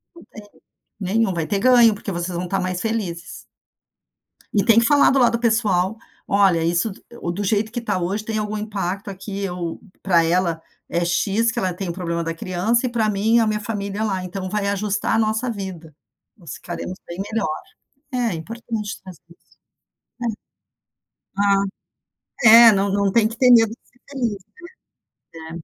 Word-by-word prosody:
Não 340 - -14
tem 215 - -13 0.6
nenhum. 200 +1 +1
Vai 165 -2 -2
ter 200 +4 -1
ganho, 240 -3 +6
porque 205 -1 -6
vocês 175 0 -3
vão 175 - -2
estar 190 +2 -1
mais 185 -1 -2
felizes. 205 -7 -4 1.1
E 200 -3 +2
tem 225 +2 +5
que 230 - +4
falar 290 -1 +5
do 270 - +2
lado 245 -2 +4
do 235 - 0
pessoal. 220 -4 +1 0.3
"Olha, 190 -5 +3
isso 175 +6 +1 0.2
do 205 -4 -4
jeito 215 +2 0
que 240 - -3
está 230 -5 -1
hoje, 195 +5 -2
tem 220 0 -2
algum 210 0 -3
impacto 200 -1 -4
aqui. 195 +1 -7
Eu 180 -4 -4 0.2
para 175 -4 +3
ela 170 -1 0 0.3
é 170 0 0
X, 200 +6 +1
que - - -5
ela 185 -1 0
tem 190 0 -5
o - - -2
problema 170 -1 -3
da 165 0 -3
criança, 195 +9 0
e - - 0
para 225 -3 0
mim, 215 +4 +2
a 225 - +2
minha 215 0 0
família 205 -1 -3
lá. 190 -4 -2
Então 185 +1 -5
vai 210 0 -2
ajustar 205 +1 -1
a - - +2
nossa 220 +3 0
vida. 185 -7 -7 0.4
Nós 170 -8 -9
ficaremos 175 +1 -6
bem 170 - -8
melhor". 195 -9 -2 0.7
É - - -3
importante 220 +4 -5
trazer 185 -4 -12
isso. 170 - -23 1.8
É. - - +3
Ah, 200 -1 +3 1.1
é, - - +7
não 195 0 +1
não 200 0 +1
tem 225 0 +4
que 225 +1 -9
ter 255 -1 +5
medo 225 -2 +6
de 230 - -9
ser 250 - -31
feliz, 240 -7 -2 1.0
né. 160 0 -9
200 Hz, 180 wpm, -21 LUFS, 180-220 Hz, 1.8 s, é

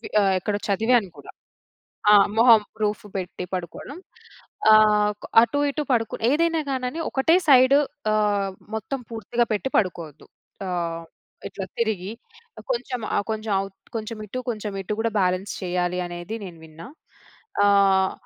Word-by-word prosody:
వి - - -8
ఆహ్, 195 -1 +3
ఎక్కడో 205 +2 -2
చదివాను 225 +1 +2
గూడా. 145 - -12 0.8
ఆ! - - +8 0.2
మొహం 230 -2 +7 0.2
రూఫ్ 210 +2 -1
పెట్టి 180 -1 -5
పడుకోవడం 185 - -6 0.7
ఆహ్, 210 -1 +5
కొ - - -7 0.2
అటు‌ఇటు 285 +5 0
పడుకుని 225 -2 -1
ఏదైనా 330 +2 +2
గానని 260 +4 -3
ఒకటే 300 +6 +3
సైడ్ 260 +1 +7 0.4
ఆహ్, 205 -2 +1 0.2
మొత్తం 220 +5 -4
పూర్తిగా 230 +2 -1
పెట్టి 215 +5 -2
పడుకోవద్దు. 170 -7 -3 0.4
ఆహ్, 170 -2 -3 0.4
ఇట్ల 195 - -8 0.2
తిరిగి 215 -3 -1 0.5
ఆహ్, - - -11
కొంచెం 260 - -4 0.2
ఆహ్, - - 0
కొంచెం 215 -1 -3
అవు 195 0 -5 0.3
కొంచెం 220 0 -5
ఇటు, 255 +5 -4
కొంచెం 215 -2 -5
ఇటు 200 +3 -3
గూడా 225 -1 -1
బ్యాలెన్స్ 185 +2 0
చేయ్యాలి 180 0 -1
అనేది 175 +5 -6
నేను 170 -3 -11
విన్నా. 160 +7 -12 0.8
ఆహ్, 195 -1 +4
210 Hz, 140 wpm, -23 LUFS, 185-240 Hz, 0.8 s, ఆ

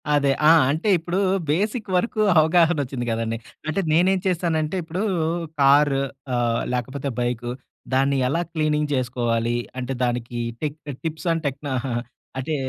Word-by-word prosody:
అదే. 145 -1 +3 0.2
ఆ! - - +9 0.2
అంటే, 160 +8 -1
ఇప్పుడూ 175 +2 -3 0.3
బేసిక్ 210 +7 0
వరుకూ 215 +4 +1 0.2
అవగాహనొచ్చింది 155 -6 +2
గదండి. 115 0 -1 0.3
అంటే, 155 +5 0
నేనేం 185 +4 +4
చేస్తానంటే 165 -2 0
ఇప్పుడూ 170 +5 -3 0.6
కార్ 140 +1 +5 0.4
ఆహ్, 120 -1 +1
లేకపోతే 130 +3 -3
బైకు, 120 0 -2 0.4
దాన్ని 135 +1 +3
ఎలా 165 +5 +1
క్లీనింగ్ 150 -2 0
చేసుకోవాలీ, 120 -2 0 0.2
అంటే, 125 +1 -3
దానికీ 120 -1 -2 0.2
టిప్ 150 0 -3 0.3
టిప్సండ్ 165 +1 -1
టెక్నా 140 +1 -4
ఆహాహా! 120 -2 -2 0.4
అంటే 155 +4 -2
145 Hz, 130 wpm, -23 LUFS, 125-165 Hz, 0.6 s, ఆ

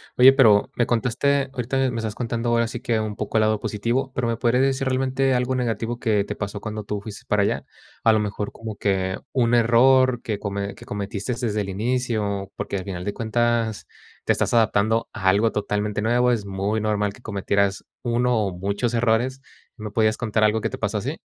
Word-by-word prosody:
Oye, 130 +2 +8
pero 110 -7 +4
me 120 - +2
contaste 135 +4 +1
ahorita 130 +1 0
me 120 - -4
estás 110 -2 -3
contando 115 0 -3
ahora 115 0 +2
sí 120 - -6
que 115 -2 0
un 105 -1 -4
poco 105 0 -5
el - - +4
lado 110 0 +2
positivo, 120 +7 -2
pero, 125 -1 0
¿me 115 - -1
podría 120 +1 +2
decir 135 0 +1
realmente 130 +1 +1
algo 125 +1 0
negativo 120 -1 -2
que 110 -4 +1
te - - -5
pasó 100 0 -5
cuando 110 -1 -5
tú 105 0 -3
fuiste 105 0 -9
para 105 -1 +2
allá?, - - -1 0.4
a 115 - +6
lo 110 - +3
mejor 105 0 -3
como 110 -2 -7
que 95 -2 0 0.2
un 120 -4 +2
error 125 +2 +4
que 105 -3 -3
come 100 0 -4
que - - -13
cometiste 100 +2 -4
desde 110 -4 -1
el 100 - -2
inicio, 105 -2 -2
porque 100 - -3
al 95 - -6
final 90 -3 -5
de 100 - -3
cuentas 115 -1 0 0.4
te - - +1
estás - - 0
adaptando 110 0 +2
a 100 -4 -3
algo 105 +4 +4
totalmente 105 0 -2
nuevo, 120 +3 +3
es 110 -4 -1
muy 100 +2 -1
normal 105 -1 0
que 110 - -16
cometieras 100 -2 0 0.2
uno 120 0 +1
o 95 - -3
muchos 100 +6 -1
errores, 120 +3 +1 0.4
¿me 105 -2 -6
podías 110 +1 +2
contar 110 -2 0
algo 105 +1 +3
que - - -1
te - - -6
pasó - - -1
así? - - -3
110 Hz, 210 wpm, -23 LUFS, 105-120 Hz, 0.4 s, Oye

